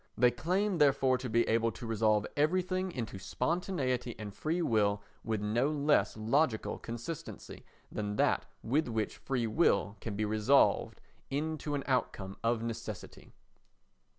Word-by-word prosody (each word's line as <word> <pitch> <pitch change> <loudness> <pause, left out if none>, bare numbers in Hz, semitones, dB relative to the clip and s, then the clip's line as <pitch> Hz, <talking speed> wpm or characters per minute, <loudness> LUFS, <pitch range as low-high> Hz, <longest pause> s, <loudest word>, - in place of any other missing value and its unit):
They 125 -1 +5
claim, 180 - 0
therefore, 135 -3 +4
to 125 -1 -4
be 115 +1 +2
able 115 0 +2
to 105 - -8
resolve 110 -2 +2
everything 185 +4 +1
into 115 - -5
spontaneity 130 - -1
and 105 -2 -7
free 165 - -1
will 105 -5 +2 0.2
with 110 -2 -1
no 115 +6 +1
less 150 -5 +2
logical 115 +2 +1
consistency 120 +7 -7 0.3
than 105 -1 -3
that - - +2 0.2
with 140 +6 +1
which 110 -2 -2
freewill 115 - +1
can 110 -3 -4
be 105 +1 0
resolved 110 +6 +3 0.3
into 150 +1 -2
an 140 - -2
outcome 100 -7 -1
of 115 0 +1
necessity. 115 -3 -7
120 Hz, 135 wpm, -32 LUFS, 110-150 Hz, 0.3 s, They